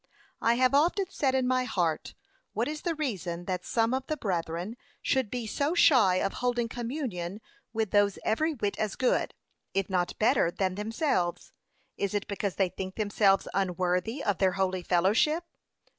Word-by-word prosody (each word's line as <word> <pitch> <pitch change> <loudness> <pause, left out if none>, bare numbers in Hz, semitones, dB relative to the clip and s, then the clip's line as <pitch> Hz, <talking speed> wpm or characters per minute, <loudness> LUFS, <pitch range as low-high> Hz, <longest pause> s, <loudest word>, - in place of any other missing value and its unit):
I 230 +1 +3
have 255 +2 +3
often 345 +7 +3
said 265 -6 +1
in 260 -1 +2
my 255 0 +2
heart, 175 -9 -1 0.4
what - - 0
is 300 0 -4
the 340 -2 -1
reason 185 - -3
that 180 -1 -2
some 225 +4 +1
of 265 0 -2
the 310 - -2
brethren 175 - -2 0.2
should 260 -5 0
be 245 +1 -3
so 285 +9 -1
shy 245 - +6
of 195 +1 0
holding 245 -1 0
communion 230 - -4 0.3
with 220 -3 -1
those, 205 -1 +3
every 310 +8 +1
whit 205 -5 -2
as 215 -2 -1
good, 255 - +1 0.4
if 195 0 0
not 180 -1 0
better 230 -4 +3
than 185 +1 -1
themselves? 210 - -1 0.5
Is 200 0 -1
it 205 - -1
because 200 -1 -2
they 190 -2 +2
think 185 +1 -6
themselves 205 -2 +2
unworthy 185 - 0
of 200 -4 0
their 190 -2 +3
holy 185 -1 0
fellowship? 205 - +2
210 Hz, 170 wpm, -29 LUFS, 185-255 Hz, 0.5 s, shy